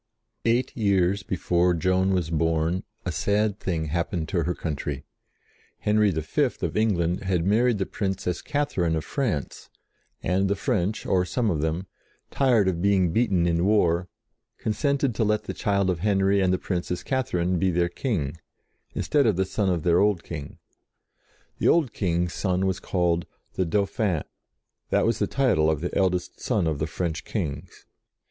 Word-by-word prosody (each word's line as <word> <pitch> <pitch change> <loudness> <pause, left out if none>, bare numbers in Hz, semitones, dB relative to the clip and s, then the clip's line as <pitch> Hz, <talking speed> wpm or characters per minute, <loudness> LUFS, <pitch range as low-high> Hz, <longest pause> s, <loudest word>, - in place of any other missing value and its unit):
Eight 120 +2 +1
years 100 -3 +2
before 90 -2 +1
Joan 95 +2 +2
was 90 -4 0
born 80 +2 +1 0.2
a 90 - -1
sad 105 +3 0
thing 80 -4 -2
happened 85 0 -2
to 85 -4 0
her 90 - -1
country. 75 -3 -4 0.7
Henry 105 0 +2
V. 80 -4 -1
of - - -1
England 90 -6 +1
had 90 -3 0
married 115 +3 +3
the 95 - -1
Princess 95 -4 -2
Katherine 120 - 0
of 80 - -3
France, 110 - -3 0.5
and 95 +2 +1
the 100 - +2
French, 105 -2 -1
or 90 -1 +2
some 110 +4 0
of 75 -4 -1
them, 80 +4 -1 0.5
tired 120 -7 +3
of 85 -2 0
being 95 -3 +3
beaten 95 -7 +2
in 85 0 +1
war, 90 -4 +2 0.5
consented 135 +4 0
to 110 - 0
let 105 0 +1
the - - -5
child 100 -2 0
of 90 -3 0
Henry 100 0 +2
and 95 -1 +2
the 95 - +2
Princess 90 -1 -3
Katherine 90 -9 0
be 95 - +2
their 85 0 +2
King, 85 - -2 0.6
instead 145 -4 +2
of 105 - +3
the 95 +2 +1
son 100 +1 -1
of 85 -4 0
their 85 0 +4
old 100 -4 +2
King. 75 -4 -7 1.0
The - - +2
old 155 -9 +3
King's 85 -2 0
son 95 -1 0
was 95 0 0
called 85 -2 0 0.3
"the 95 - 0
Dauphin"; 100 -1 0 0.7
that - - +2
was - - +1
the - - +1
title 125 - +2
of 80 -2 +1
the 90 +3 -4
eldest 90 -2 0
son - - 0
of 80 -3 -1
the 75 - -1
French 80 0 -3
kings. 85 -4 -5
95 Hz, 165 wpm, -25 LUFS, 85-105 Hz, 1.0 s, their